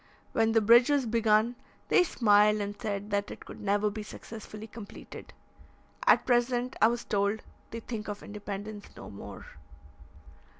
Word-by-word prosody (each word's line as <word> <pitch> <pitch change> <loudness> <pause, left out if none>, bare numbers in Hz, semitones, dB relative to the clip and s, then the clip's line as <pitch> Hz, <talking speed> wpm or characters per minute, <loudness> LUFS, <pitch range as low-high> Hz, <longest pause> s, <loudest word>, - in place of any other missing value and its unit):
When 225 0 +2
the 225 - +4
bridge 235 +4 +6
was 285 -3 +2
begun, 225 +1 +2 0.3
they - - +6
smiled, 210 -8 +4
and 205 0 -3
said 205 -2 -3
that 200 0 0
it - - -10
could - - -10
never 205 +1 +1
be 215 +1 -5
successfully 215 0 -9
completed. 220 -2 -11 0.8
At - - +6
present, 245 0 +1
I 220 - +8
was 240 +1 -2
told, 200 +1 0 0.3
they 230 - -6
think 220 -2 -6
of 205 0 -6
independence 205 0 -7
no - - -9
more. 100 - -9
215 Hz, 155 wpm, -29 LUFS, 205-230 Hz, 0.8 s, I